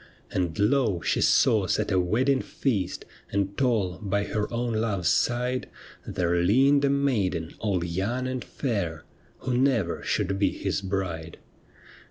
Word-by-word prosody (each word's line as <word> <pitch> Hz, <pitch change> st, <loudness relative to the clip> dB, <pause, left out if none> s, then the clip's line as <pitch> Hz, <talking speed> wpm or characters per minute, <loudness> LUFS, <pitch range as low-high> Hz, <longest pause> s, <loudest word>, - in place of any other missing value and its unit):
And 85 Hz, -3 st, -1 dB
lo! 105 Hz, -3 st, +2 dB
she -, -, 0 dB
saw 105 Hz, -4 st, +4 dB
set 110 Hz, +2 st, 0 dB
a 95 Hz, -, +3 dB
wedding 130 Hz, +10 st, +2 dB
feast, 105 Hz, -10 st, -2 dB, 0.3 s
And 100 Hz, 0 st, -1 dB
tall 105 Hz, -10 st, 0 dB
by 100 Hz, 0 st, 0 dB
her 105 Hz, 0 st, -2 dB
own 120 Hz, 0 st, -1 dB
love's 105 Hz, -6 st, 0 dB
side 125 Hz, +1 st, 0 dB, 0.4 s
There 85 Hz, -1 st, 0 dB
leaned 135 Hz, +10 st, +4 dB
a 140 Hz, -, +3 dB
maiden 105 Hz, -13 st, 0 dB
all 100 Hz, -5 st, 0 dB
young 100 Hz, +9 st, -2 dB
and 130 Hz, -1 st, -3 dB
fair 90 Hz, -, -3 dB, 0.4 s
Who 130 Hz, -1 st, -1 dB
never 130 Hz, -4 st, +1 dB
should 95 Hz, 0 st, -1 dB
be 100 Hz, -, +3 dB
his 100 Hz, 0 st, -2 dB
bride. 90 Hz, -4 st, -3 dB
105 Hz, 145 wpm, -26 LUFS, 90-125 Hz, 0.4 s, saw